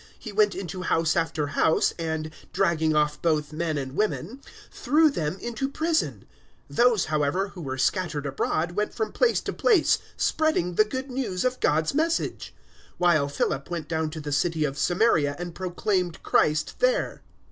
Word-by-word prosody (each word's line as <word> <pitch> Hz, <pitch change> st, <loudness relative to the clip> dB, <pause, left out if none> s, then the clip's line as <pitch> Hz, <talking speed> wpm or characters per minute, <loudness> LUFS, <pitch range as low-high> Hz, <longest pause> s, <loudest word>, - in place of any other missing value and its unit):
He 220 Hz, -, -8 dB
went 205 Hz, -1 st, +3 dB
into 185 Hz, -1 st, -5 dB
house 165 Hz, -3 st, +1 dB
after 165 Hz, -2 st, 0 dB
house, 160 Hz, -, +3 dB
and, 160 Hz, -1 st, -3 dB, 0.2 s
dragging 165 Hz, -5 st, +2 dB
off 150 Hz, 0 st, +1 dB
both 155 Hz, -2 st, 0 dB
men 160 Hz, -1 st, -1 dB
and 135 Hz, -1 st, -5 dB
women, 215 Hz, -, -2 dB, 0.3 s
threw 305 Hz, +4 st, +3 dB
them 165 Hz, -, -2 dB
into 240 Hz, +3 st, -3 dB
prison. 320 Hz, +3 st, -1 dB, 0.5 s
008:004 -, -, -10 dB
Those, 235 Hz, -5 st, +4 dB
however, 155 Hz, +5 st, 0 dB
who 185 Hz, -, -10 dB
were 130 Hz, -3 st, -4 dB
scattered 150 Hz, +1 st, 0 dB
abroad 155 Hz, +4 st, -1 dB
went 210 Hz, +4 st, -2 dB
from 435 Hz, -, -2 dB
place -, -, +2 dB
to -, -, -4 dB
place 420 Hz, -10 st, +3 dB, 0.2 s
spreading 310 Hz, -, +1 dB
the 215 Hz, +5 st, +4 dB
Good 260 Hz, +4 st, -5 dB
News 245 Hz, -8 st, -2 dB
of 255 Hz, 0 st, 0 dB
God's 155 Hz, +1 st, +1 dB
Message; 325 Hz, +3 st, -1 dB, 0.4 s
008:005 -, -, -36 dB
while 155 Hz, -5 st, +3 dB
Philip 140 Hz, 0 st, -2 dB
went 170 Hz, -3 st, -4 dB
down 160 Hz, -1 st, -1 dB
to 155 Hz, +1 st, -7 dB
the 150 Hz, -1 st, -5 dB
city 160 Hz, +2 st, +1 dB
of 135 Hz, -2 st, -3 dB
Samaria 160 Hz, -3 st, +2 dB
and 175 Hz, -1 st, -6 dB
proclaimed 180 Hz, -1 st, -2 dB
Christ 150 Hz, 0 st, +1 dB
there. -, -, +1 dB
175 Hz, 170 wpm, -26 LUFS, 155-225 Hz, 0.5 s, Those